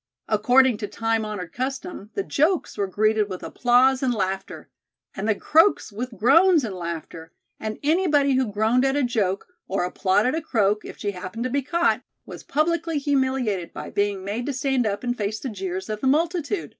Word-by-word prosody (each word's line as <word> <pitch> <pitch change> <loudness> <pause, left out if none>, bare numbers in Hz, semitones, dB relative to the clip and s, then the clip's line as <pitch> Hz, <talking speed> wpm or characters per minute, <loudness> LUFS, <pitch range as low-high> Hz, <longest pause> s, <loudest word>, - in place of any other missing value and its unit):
According 245 +3 +4
to 205 - -4
time 225 0 -1
honored 205 -6 -6
custom, 265 - -5
the 395 - -1
jokes 330 +1 0
were 200 -2 -1
greeted 215 +2 +1
with 185 -1 -6
applause 255 +2 +3
and 260 -2 +1
laughter, 195 -3 -3 0.5
and 205 +3 -3
the 215 - +3
croaks 325 - +3
with 230 +2 -6
groans 330 - +5
and 215 -4 -3
laughter, 170 -2 -7 0.3
and 215 0 -4
anybody 295 -3 +3
who 255 -4 +1
groaned 220 +5 +2
at 270 0 +2
a 290 - +1
joke 205 -6 0 0.2
or 190 -2 -1
applauded 190 +6 +1
a 325 - -1
croak, 215 -7 +1
if - - -9
she 205 - -2
happened 185 +4 -6
to 255 - -2
be 280 +2 +1
caught, 340 +6 +1 0.2
was - - -9
publicly 330 +1 0
humiliated 260 - 0
by - - -7
being 200 -2 -1
made 220 +6 -3
to 285 - -1
stand 260 -3 0
up 205 +2 -3
and 245 -1 -2
face 210 +1 -2
the 265 - -4
jeers 190 -3 -5
of 215 -1 -4
the 265 - 0
multitude. 335 +5 0
235 Hz, 190 wpm, -24 LUFS, 205-275 Hz, 0.5 s, groans